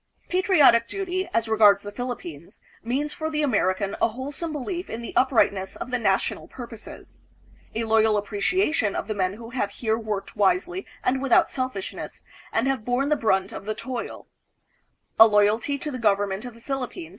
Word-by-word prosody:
Patriotic 305 - +5
duty, 375 -2 -3
as 230 -6 0
regards 210 -2 +5
the 205 - -6
Philip 245 +3 -4
pines, 165 -1 -10 0.2
means 275 +6 -1
for 315 -2 -3
the 305 -1 -1
American 200 -6 +1
a - - +5
wholesome 275 +8 -5
belief 345 +5 -4
in 230 +1 -5
the - - -7
uprightness 200 -7 +2
of 250 - -7
the 250 - 0
national 195 -4 0
purposes; 235 -3 -11 0.5
a 230 - 0
loyal 220 -1 +3
appreciation 210 - 0
of - - -3
the 215 - -1
men 185 -2 0
who 230 +2 -10
have 235 -5 -1
here 220 +2 -1
worked 210 -3 -4
wisely 360 - +1 0.2
and 260 +1 +1
without 275 -2 +4
selfishness, 255 -7 -5 0.3
and 230 +4 +1
have 270 -5 0
borne 245 +4 0
the 300 - +4
brunt 190 -7 +1
of 195 - -8
the 215 0 -2
toil; 245 +1 -6 0.9
a 225 - +11
loyalty 215 +6 +2
to 295 +2 -5
the 255 - -5
government 205 -1 +1
of 245 -2 -8
the 230 - -17
Philippines 250 - -4
230 Hz, 180 wpm, -25 LUFS, 205-270 Hz, 0.9 s, a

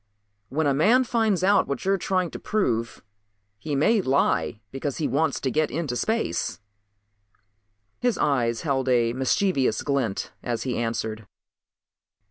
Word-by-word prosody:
"When 155 +3 0
a 140 - +3
man 220 - +4
finds 220 -6 +1
out 200 +1 +4
what 140 - -4
you 195 - +2
are 195 - +3
trying 185 -2 0
to - - -7
prove 120 - -1 0.6
he 150 +2 -3
may 210 +10 +3
lie 135 - +1
because 135 +1 -4
he 155 - 0
wants 155 +1 0
to 130 - -1
get 155 +2 +1
into 150 -5 -3
space." 220 - -1 1.4
His 245 -2 +1
eyes 120 -5 +1
held 135 -4 0
a 120 -2 +3
mischievous 130 - +1
glint 135 -8 -1
as 120 -2 -3
he 130 -2 -2
answered. 110 -2 -3
140 Hz, 145 wpm, -25 LUFS, 120-185 Hz, 1.4 s, man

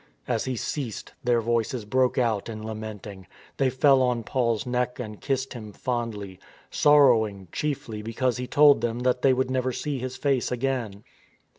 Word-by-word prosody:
As 115 -3 -1
he 130 -1 -2
ceased, 120 -1 -4
their 120 -1 +2
voices 115 0 -1
broke 130 +4 +1
out 115 -4 0
in 110 -1 -6
lamenting. 105 -3 -7 0.3
They 135 -1 +2
fell 135 +1 +4
on 125 -2 +1
Paul's 115 -3 0
neck 125 0 -1
and 105 -4 -7
kissed 135 -1 -2
him 110 -4 -9
fondly, 110 -7 -4 0.3
sorrowing 115 - +4
chiefly 125 -7 -3
because 115 +3 -1
he 125 0 -4
told 145 -3 +5
them 120 0 -2
that 125 0 +1
they 135 - +5
would 130 0 0
never 130 0 0
see 140 +2 -3
his 130 +1 -5
face 135 -4 0
again. 120 -5 -2
125 Hz, 165 wpm, -26 LUFS, 110-130 Hz, 0.3 s, told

